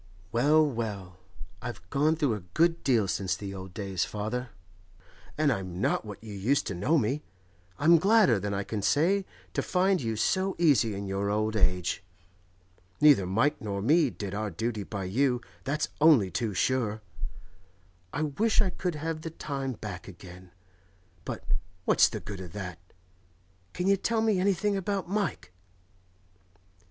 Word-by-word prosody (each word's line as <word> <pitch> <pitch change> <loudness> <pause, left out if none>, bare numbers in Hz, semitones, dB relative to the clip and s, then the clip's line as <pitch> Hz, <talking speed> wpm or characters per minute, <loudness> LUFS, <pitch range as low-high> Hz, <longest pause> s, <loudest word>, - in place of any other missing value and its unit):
Well, 150 +6 +4
well; 105 -9 -4 0.4
I've 120 -8 -7
gone 150 +3 +3
through 145 -7 +1
a 105 - -3 0.2
good 165 +1 +3
deal 115 -7 +3
since 95 -1 -1
the 100 -1 -6
old 95 -1 -8
days, 95 -4 -1
father, 115 +4 -3 0.9
and 150 -2 +3
I'm 95 -4 -5
not 100 - +1
what 105 0 -9
you 110 -2 -8
used 115 +9 +1
to - - -2
know 105 - +2
me. 135 +3 0 0.6
I'm 165 +3 +6
gladder 195 - +5
than 100 +1 -3
I 100 0 -1
can 105 +1 -4
say 180 - +2 0.3
to - - 0
find 185 0 +2
you 115 -2 -2
so 190 - +1
easy 130 -11 +3
in 100 +1 -4
your 100 +1 -1
old 110 +1 0
age. 90 -4 +1 1.0
Neither 140 -12 +6
Mike 130 +11 +1
nor 100 -2 -3
me 150 - +4
did 100 -4 -6
our 105 +1 -2
duty 110 +4 -3
by 100 0 -5
you, 125 +7 +1 0.3
that's 145 +3 -1
only 140 - +6
too 110 +1 -2
sure. 110 -2 0 1.1
I 150 - -1
wish 210 +10 +1
I 195 -4 +3
could 180 -3 -3
have 155 +1 -3
the 165 - -5
time 135 -4 -4
back 105 -5 -7
again; 90 -1 -12 0.8
but - - -5 0.4
what's - - +5
the - - -5
good 100 -2 -7
of 90 -3 -9
that? 90 -5 -6 0.9
Can 180 - -2
you 195 0 +4
tell 225 +3 0
me 215 -4 +2
anything 200 +2 +1
about 195 0 -2
Mike? 190 - -2
120 Hz, 160 wpm, -28 LUFS, 100-160 Hz, 1.1 s, I'm